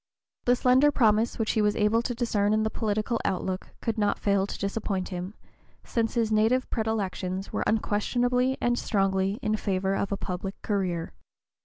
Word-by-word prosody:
The 245 - +5
slender 255 +4 +4
promise 225 -4 +2
which 220 -1 0
he 220 - +1
was 210 0 +2
able 220 +1 +2
to 245 0 -3
discern 215 -3 +1
in 215 - +1
the 220 - -1
political 215 +2 -1
outlook 185 0 -2
could 225 -2 -2
not 205 -1 +2
fail 200 -1 +1
to - - -6
disappoint 200 -2 -2
him, 180 +2 -5 0.5
since 230 0 -1
his 225 -2 +1
native 225 +4 +3
predilections 195 -4 -2
were - - 0
unquestionably 245 +4 +1
and 240 0 +1
strongly 195 -1 +1
in 215 - +1
favor 190 -2 -1
of 200 - -2
a 200 - 0
public 190 +1 -5
career. 185 -5 -1
210 Hz, 170 wpm, -27 LUFS, 195-230 Hz, 0.5 s, The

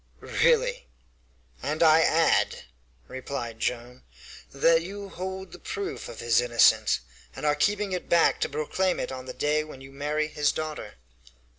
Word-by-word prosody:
"Really!" - - +2 0.7
"And 150 +5 0
I 160 0 +7
add," 165 0 +2 0.4
replied 125 -3 -6
Joam, 125 +1 -3 0.5
"that 165 +4 +3
you 200 +3 -7
hold 190 +1 -6
the - - -11
proof 405 -1 -5
of 115 - -9
his 120 0 +3
innocence, 120 - +3 0.3
and - - -6
are 150 - +4
keeping 205 +6 0
it 180 -1 -4
back 170 -1 +4
to - - 0
proclaim 155 +6 -1
it - - -3
on 130 0 -7
the - - -4
day 150 +1 0
when 155 -3 -11
you 135 0 -12
marry 150 +2 -2
his 150 -1 +1
daughter." 155 -9 -6
155 Hz, 155 wpm, -26 LUFS, 130-185 Hz, 0.7 s, I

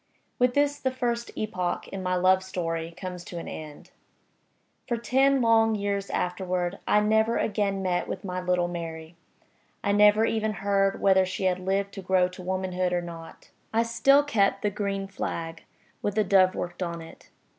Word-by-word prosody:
With 250 0 +3
this 285 0 +2
the 260 - 0
first 240 -2 -2
epoch 185 -5 -2
in 195 - -5
my 185 0 0
love 185 +1 +4
story 165 -3 -3
comes 180 -2 -6
to 175 - -7
an 165 - -6
end. 150 -2 -9 1.0
For 240 -1 0
ten 265 +3 +3
long 225 -1 +4
years 200 -1 -2
afterward 180 0 -2
I 210 - +4
never 220 +2 +2
again 200 -2 0
met 180 -1 0
with - - -5
my 185 -1 -3
little 180 -1 +1
Mary; 165 -1 -6 0.7
I 200 - +1
never 210 +2 +5
even 220 -1 0
heard 195 -1 +2
whether 190 -1 +5
she 185 +1 -4
had 185 -1 +1
lived 195 +2 -1
to 195 - -7
grow 185 -1 +2
to 180 0 -11
womanhood 185 0 -1
or 175 - +1
not. 165 -1 -10 0.2
I 225 +1 +2
still 275 +5 +4
kept 210 -9 +1
the 210 - +1
green 200 -1 -2
flag, 165 -4 -5 0.4
with 205 - -2
the 215 - +3
dove 185 -1 +4
worked 175 +1 -5
on 170 -2 -3
it. 165 - -15
195 Hz, 175 wpm, -26 LUFS, 180-215 Hz, 1.0 s, never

